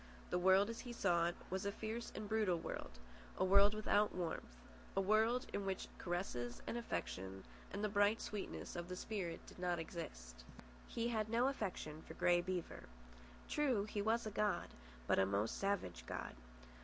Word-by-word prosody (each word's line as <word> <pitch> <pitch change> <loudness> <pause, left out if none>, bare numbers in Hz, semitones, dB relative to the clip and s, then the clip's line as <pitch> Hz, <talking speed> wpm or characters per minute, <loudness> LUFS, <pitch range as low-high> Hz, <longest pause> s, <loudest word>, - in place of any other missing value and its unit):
The 180 - +2
world 190 +2 +6
as 230 - -7
he 245 - -6
saw 175 -6 +3
it 175 - -2 0.2
was 190 +2 -1
a 200 - 0
fierce 220 +3 -4
and 210 0 -4
brutal 210 -5 +2
world, - - -5 0.4
a - - +3
world 200 +2 +7
without 210 -1 +3
warmth, 165 - -3 0.4
a - - +3
world 220 +5 +3
in 200 - -1
which 190 -1 -2
caresses 125 -10 -2
and - - -2
affection 95 - -3 0.3
and 200 +2 -3
the - - +3
bright 205 +2 +4
sweetnesses 205 -3 -4
of 175 0 -4
the 180 - -3
spirit 185 -4 -3
did - - -13
not 180 -1 +1
exist. 110 - -6 0.4
He 235 0 -1
had 220 -2 0
no 235 +3 +3
affection 180 - -3
for - - -10
Grey 175 0 +4
Beaver. 180 -1 -3 0.6
True, 260 -9 +2
he 210 -1 -2
was 225 +3 +2
a 215 - -3
god, 210 0 +1 0.4
but - - +3
a 95 - +5
most 100 +3 0
savage 195 - -1
god. - - -4
195 Hz, 180 wpm, -39 LUFS, 175-215 Hz, 0.6 s, world